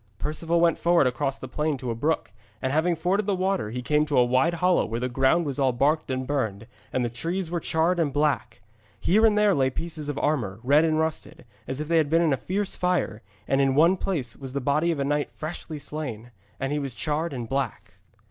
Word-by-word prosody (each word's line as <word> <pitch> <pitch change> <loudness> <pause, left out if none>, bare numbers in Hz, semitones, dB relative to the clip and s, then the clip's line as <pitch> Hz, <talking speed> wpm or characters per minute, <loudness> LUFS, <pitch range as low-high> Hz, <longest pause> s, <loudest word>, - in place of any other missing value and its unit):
Perceval 165 +6 -1
went 170 -1 +3
forward 170 -3 +4
across 135 +2 -1
the 130 - -8
plain 150 +3 -1
to 125 -2 -4
a - - 0
brook, 145 +1 -1 0.3
and 130 +3 -2
having 170 +3 +2
forded 190 +5 0
the 200 - +2
water 185 - 0
he 125 +3 -5
came 150 +3 +2
to 145 - 0
a 125 - +6
wide 130 +8 +2
hollow 180 +2 +3
where 115 +1 -3
the 125 - -1
ground 135 +7 +2
was 140 -1 -3
all 135 -2 +3
baked 145 +6 +1
and 130 0 -2
burned, 115 -7 -2 0.3
and 125 -1 0
the - - +1
trees 165 +9 -3
were 175 - 0
charred 165 +2 +1
and 155 -4 +1
black. 145 -7 0 0.4
Here 215 +5 +4
and 210 -1 +2
there 210 -1 +4
lay 135 -4 +2
pieces 155 +1 -5
of 145 - -3
armour, 115 -11 -1
red 145 +5 +5
and 155 -1 +1
rusted, 160 -5 -3 0.2
as 130 +2 -3
if 150 - -3
they 165 +1 +2
had 155 -3 +2
been 165 +2 +3
in 155 -4 +3
a - - 0
fierce 195 +6 -2
fire; 180 -12 0 0.3
and 135 0 +2
in 135 -1 +2
one 165 +5 +5
place 160 -11 -3
was 135 -2 -8
the 140 - -1
body 145 +5 +1
of 165 - 0
a 140 - -1
knight 145 +1 0
freshly 155 0 -6
slain, 130 -6 -6 0.3
and 135 +1 -2
he 150 - 0
was 135 -4 -5
charred 155 +4 -2
and 120 -4 -5
black. 135 -2 -4
150 Hz, 235 wpm, -25 LUFS, 130-170 Hz, 0.4 s, a